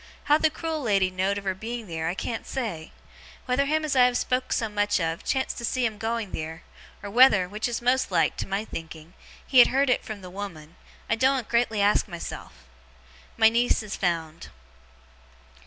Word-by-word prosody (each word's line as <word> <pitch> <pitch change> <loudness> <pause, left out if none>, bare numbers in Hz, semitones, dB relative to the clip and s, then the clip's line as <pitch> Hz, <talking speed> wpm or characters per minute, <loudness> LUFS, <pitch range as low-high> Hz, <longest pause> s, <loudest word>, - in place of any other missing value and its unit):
How 295 +1 +4
the 315 - +3
cruel 320 0 -4
lady 195 -6 +2
know'd 190 +2 0
of 200 - -5
her 190 -1 -1
being 230 +4 -6
theer, 165 -3 -4
I 170 - -2
can't 225 +3 -4
say. 210 -12 -4 0.5
Whether 255 +2 +1
him 310 +2 0
as 295 - -1
I 250 -1 +6
have 250 0 +2
spoke 255 0 -1
so 225 - 0
much 205 -1 0
of, 165 -1 -2
chanced 265 -1 -1
to - - -7
see 250 +1 0
'em 215 -2 -3
going 225 -2 -2
theer, 160 +1 -6 0.4
or 200 - -6
whether 220 -6 +6
(which 210 +5 -3
is 240 0 -4
most 255 +2 +2
like, - - +2
to - - -4
my 195 +2 -2
thinking) 160 -2 -9 0.3
he 260 - +4
had 245 - +9
heerd 270 0 +2
it - - +1
from 215 -2 -7
the 180 -1 -10
woman, 175 -5 -8 0.3
I - - +1
doen't 260 +1 +1
greatly 235 -3 +1
ask 205 +1 +3
myself. 170 - -8 0.7
My 220 - +6
niece 235 0 +1
is 210 - -5
found. 165 -3 -3
215 Hz, 200 wpm, -26 LUFS, 185-250 Hz, 0.7 s, had